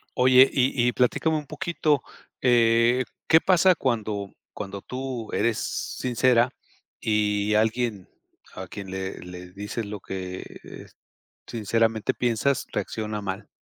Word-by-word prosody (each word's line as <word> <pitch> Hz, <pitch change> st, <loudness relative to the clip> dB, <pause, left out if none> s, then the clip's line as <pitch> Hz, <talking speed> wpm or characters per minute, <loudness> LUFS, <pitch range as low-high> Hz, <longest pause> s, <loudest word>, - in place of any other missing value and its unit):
Oye, 130 Hz, +1 st, +6 dB
y 130 Hz, -2 st, +2 dB
y -, -, +3 dB
platícame 145 Hz, +6 st, +1 dB
un 150 Hz, -, -5 dB
poquito. 150 Hz, 0 st, 0 dB, 0.4 s
Eh, 120 Hz, 0 st, +4 dB, 0.2 s
¿qué 160 Hz, -, +7 dB
pasa 185 Hz, -1 st, +5 dB
cuando 110 Hz, -7 st, -2 dB, 0.2 s
cuando 100 Hz, 0 st, -6 dB
tú 125 Hz, -2 st, -5 dB
eres 115 Hz, -2 st, +1 dB
sincera 125 Hz, 0 st, +1 dB, 0.5 s
y 105 Hz, -1 st, +1 dB
alguien 110 Hz, -2 st, 0 dB, 0.5 s
a 95 Hz, 0 st, -7 dB
quien 100 Hz, +1 st, -8 dB
le 95 Hz, 0 st, -4 dB
le 90 Hz, 0 st, -10 dB
dices 105 Hz, +4 st, -5 dB
lo 105 Hz, 0 st, -6 dB
que, 95 Hz, -1 st, -6 dB, 0.2 s
eh, -, -, -11 dB, 0.6 s
sinceramente 115 Hz, 0 st, 0 dB
piensas 125 Hz, +3 st, 0 dB
reacciona 105 Hz, +1 st, -3 dB
mal? 100 Hz, +1 st, -5 dB
115 Hz, 125 wpm, -25 LUFS, 100-125 Hz, 0.6 s, qué